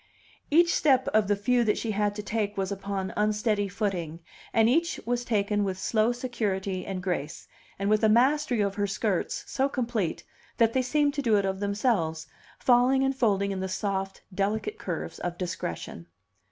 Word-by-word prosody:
Each 335 Hz, +3 st, +5 dB
step 265 Hz, -4 st, +3 dB
of 215 Hz, -2 st, +2 dB
the 205 Hz, -, +3 dB
few 240 Hz, +5 st, +2 dB
that 210 Hz, -2 st, +1 dB
she 225 Hz, -, -2 dB
had 205 Hz, 0 st, 0 dB
to 210 Hz, -, -5 dB
take 205 Hz, -1 st, -2 dB
was 195 Hz, 0 st, -1 dB
upon 195 Hz, -1 st, -3 dB
unsteady 210 Hz, 0 st, +1 dB
footing, 180 Hz, -5 st, -3 dB, 0.3 s
and 225 Hz, 0 st, +4 dB
each 330 Hz, +7 st, +1 dB
was 245 Hz, +1 st, -1 dB
taken 205 Hz, -3 st, 0 dB
with 190 Hz, -2 st, -2 dB
slow 220 Hz, +4 st, +1 dB
security 205 Hz, -7 st, -3 dB
and 185 Hz, -2 st, -4 dB
grace, 165 Hz, -5 st, -3 dB, 0.3 s
and 195 Hz, -, -2 dB
with 215 Hz, +1 st, +2 dB
a 220 Hz, -, +5 dB
mastery 255 Hz, +1 st, +3 dB
of 200 Hz, -1 st, 0 dB
her 205 Hz, 0 st, -1 dB
skirts 200 Hz, -1 st, -1 dB
so 270 Hz, +1 st, 0 dB
complete 235 Hz, -, -2 dB, 0.3 s
that 230 Hz, -1 st, +3 dB
they 260 Hz, -, +2 dB
seemed 290 Hz, +3 st, +1 dB
to 285 Hz, -, -2 dB
do 225 Hz, -6 st, +3 dB
it 200 Hz, -, +1 dB
of 190 Hz, 0 st, -2 dB
themselves, 200 Hz, -6 st, 0 dB, 0.3 s
falling 255 Hz, +2 st, +4 dB
and 270 Hz, 0 st, +1 dB
folding 200 Hz, -6 st, +1 dB
in 195 Hz, -, -3 dB
the 190 Hz, 0 st, -3 dB
soft, 195 Hz, 0 st, -3 dB
delicate 215 Hz, -, -1 dB
curves -, -, -5 dB
of 175 Hz, 0 st, -4 dB
discretion. 85 Hz, -, -5 dB
210 Hz, 180 wpm, -27 LUFS, 195-240 Hz, 0.3 s, Each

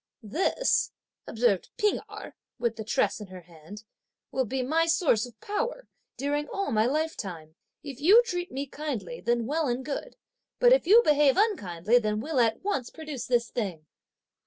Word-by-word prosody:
"This," 385 Hz, -, +1 dB, 0.4 s
observed 225 Hz, -5 st, +1 dB
P'ing 420 Hz, 0 st, +2 dB
Erh, 420 Hz, +1 st, -9 dB, 0.2 s
with 235 Hz, -1 st, -1 dB
the 220 Hz, -, -6 dB
tress 220 Hz, -, 0 dB
in 210 Hz, -, -8 dB
her 185 Hz, -1 st, -10 dB
hand, 170 Hz, +5 st, -13 dB, 0.5 s
"will 260 Hz, -1 st, 0 dB
be 260 Hz, +3 st, -2 dB
my 320 Hz, +5 st, +1 dB
source 285 Hz, -, +2 dB
of 230 Hz, -3 st, -17 dB
power, 480 Hz, -, -3 dB, 0.3 s
during 290 Hz, +2 st, -1 dB
all 395 Hz, +5 st, -3 dB
my 220 Hz, +1 st, +3 dB
lifetime! 205 Hz, -, -3 dB, 0.3 s
if 280 Hz, -2 st, -8 dB
you 410 Hz, +10 st, +7 dB
treat 355 Hz, -6 st, -4 dB
me 275 Hz, +2 st, -3 dB
kindly, 300 Hz, -, -5 dB
then 235 Hz, -1 st, 0 dB
well 305 Hz, +4 st, 0 dB
and 250 Hz, +1 st, -2 dB
good! 300 Hz, -, -5 dB, 0.4 s
but -, -, +6 dB
if -, -, +2 dB
you 455 Hz, +5 st, +7 dB
behave 295 Hz, -, +4 dB
unkindly, 230 Hz, -, +2 dB
then 215 Hz, -2 st, -1 dB
we'll 285 Hz, +3 st, -1 dB
at 225 Hz, +3 st, +1 dB
once 280 Hz, -12 st, -2 dB
produce 305 Hz, -6 st, -7 dB
this 240 Hz, -2 st, +1 dB
thing!" 185 Hz, -10 st, -4 dB
265 Hz, 170 wpm, -27 LUFS, 220-330 Hz, 0.5 s, you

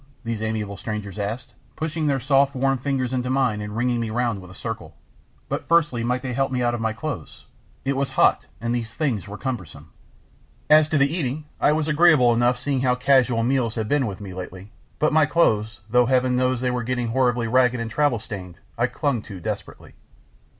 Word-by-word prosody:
these 115 Hz, -2 st, -3 dB
amiable 110 Hz, -2 st, -2 dB
strangers 105 Hz, -2 st, -5 dB
asked, 105 Hz, +5 st, -4 dB, 0.2 s
pushing 155 Hz, 0 st, -2 dB
their 140 Hz, -2 st, +1 dB
soft 135 Hz, +2 st, +2 dB
warm 135 Hz, +1 st, +2 dB
fingers 130 Hz, -1 st, -1 dB
into 125 Hz, -1 st, -1 dB
mine 130 Hz, -5 st, +1 dB
and 105 Hz, +1 st, -6 dB
ringing 120 Hz, 0 st, +1 dB
me 115 Hz, -1 st, -2 dB
round 115 Hz, -3 st, -1 dB
with 90 Hz, -, -12 dB
a -, -, -12 dB
circle. -, -, -6 dB, 0.5 s
"But -, -, -4 dB
firstly 150 Hz, -8 st, +2 dB
might 125 Hz, +2 st, -1 dB
they 130 Hz, -2 st, -3 dB
help 135 Hz, +1 st, 0 dB
me 125 Hz, -1 st, 0 dB
out 120 Hz, 0 st, +1 dB
of 120 Hz, -, -3 dB
my 110 Hz, 0 st, 0 dB
clothes? 115 Hz, -, -6 dB, 0.4 s
It 135 Hz, 0 st, 0 dB
was 135 Hz, 0 st, 0 dB
hot, -, -, +4 dB
and 115 Hz, +2 st, -2 dB
these 115 Hz, -2 st, -3 dB
things 115 Hz, -, -2 dB
were 105 Hz, +1 st, -7 dB
cumbersome." 90 Hz, -, -6 dB, 0.8 s
As 155 Hz, 0 st, +7 dB
to 155 Hz, -, +2 dB
the 140 Hz, +2 st, +3 dB
eating, 150 Hz, -2 st, -2 dB
I -, -, +4 dB
was 155 Hz, 0 st, 0 dB
agreeable 155 Hz, -6 st, +5 dB
enough 120 Hz, +1 st, +2 dB
seeing 130 Hz, 0 st, -1 dB
how 125 Hz, -1 st, +2 dB
casual 125 Hz, -3 st, +3 dB
meals 120 Hz, -2 st, +1 dB
had 110 Hz, -2 st, -2 dB
been 140 Hz, 0 st, +1 dB
with 100 Hz, -3 st, -6 dB
me 95 Hz, -2 st, -7 dB
lately, 95 Hz, +2 st, -8 dB, 0.3 s
but 155 Hz, 0 st, +1 dB
my 155 Hz, -1 st, +5 dB
clothes, 110 Hz, -10 st, +1 dB
though 125 Hz, +2 st, +3 dB
Heaven 130 Hz, -1 st, +2 dB
knows 125 Hz, -1 st, +1 dB
they 125 Hz, -1 st, +1 dB
were 125 Hz, 0 st, -1 dB
getting 120 Hz, 0 st, -2 dB
horribly 120 Hz, -1 st, +1 dB
ragged 125 Hz, +1 st, +3 dB
and 115 Hz, -1 st, -4 dB
travel 145 Hz, -1 st, +2 dB
stained, 95 Hz, -6 st, -8 dB, 0.2 s
I 120 Hz, -, +3 dB
clung 140 Hz, -4 st, -1 dB
to 95 Hz, -3 st, -7 dB
desperately. -, -, -6 dB
125 Hz, 205 wpm, -23 LUFS, 110-135 Hz, 0.8 s, As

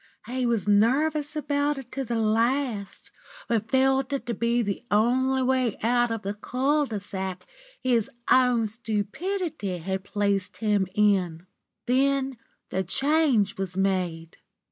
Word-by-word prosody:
He 250 Hz, +1 st, -1 dB
was 230 Hz, -4 st, 0 dB
nervous 285 Hz, +9 st, +2 dB
about 290 Hz, -1 st, 0 dB
it 265 Hz, -2 st, -9 dB
to 270 Hz, -, -3 dB
the 235 Hz, -2 st, -3 dB
last, 225 Hz, -1 st, 0 dB, 0.4 s
but 225 Hz, -1 st, -1 dB
felt 265 Hz, +1 st, +2 dB
it 275 Hz, -, -2 dB
to 235 Hz, -, -2 dB
be 235 Hz, +2 st, +1 dB
the 200 Hz, +2 st, -3 dB
only 260 Hz, +5 st, +2 dB
way 255 Hz, -4 st, +1 dB
out 240 Hz, +1 st, +3 dB
of 225 Hz, -2 st, -3 dB
the 200 Hz, +1 st, -2 dB
cul 275 Hz, +7 st, 0 dB
de 215 Hz, -4 st, -3 dB
sac 190 Hz, -1 st, -5 dB, 0.4 s
his 240 Hz, -4 st, +2 dB, 0.2 s
own 250 Hz, -3 st, +4 dB
stupidity 220 Hz, -, -3 dB
had 190 Hz, +3 st, -3 dB
placed 200 Hz, -1 st, -1 dB
him 210 Hz, -3 st, +1 dB
in. 185 Hz, -5 st, +2 dB, 0.4 s
Then 270 Hz, 0 st, +1 dB, 0.3 s
the 190 Hz, -, 0 dB
change 265 Hz, -, +2 dB
was 190 Hz, -1 st, -4 dB
made. 180 Hz, -4 st, -1 dB
230 Hz, 140 wpm, -26 LUFS, 200-265 Hz, 0.4 s, own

